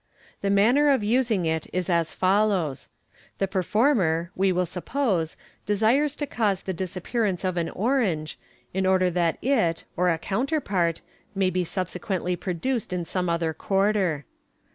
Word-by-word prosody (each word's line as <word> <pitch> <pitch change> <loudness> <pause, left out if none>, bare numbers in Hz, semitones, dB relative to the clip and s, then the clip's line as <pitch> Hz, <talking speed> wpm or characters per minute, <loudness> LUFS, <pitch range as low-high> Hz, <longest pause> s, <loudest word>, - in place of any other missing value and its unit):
The 200 - 0
manner 240 +9 +4
of 270 -6 +3
using 225 -4 +1
it 160 -1 -1
is 180 -1 -2
as 170 -2 +1
follows: 190 -6 +1 0.2
— - - -30
The 195 - 0
perform 210 - +2
er, 165 +1 0
we 190 0 +2
will 180 0 +1
suppose, 180 - -1 0.3
desires 235 +8 +2
to 295 - -2
cause 210 -8 0
the 190 - -3
disappearance 185 +3 -2
of 185 -1 -1
an 170 -2 -1
orange, 195 - 0 0.3
in 190 0 0
order 185 -1 +3
that 170 -2 +1
it 215 -11 +1
(or 180 +1 +2
a 165 - +2
counterpart) 195 - -1 0.3
may 190 -1 +2
be 180 0 0
subse 180 +1 -4
quently 180 -3 -2
produced 195 +7 -2
in 180 -2 -2
some 180 0 -2
other 165 -1 0
quarter. 195 -5 0
190 Hz, 160 wpm, -25 LUFS, 175-215 Hz, 0.3 s, manner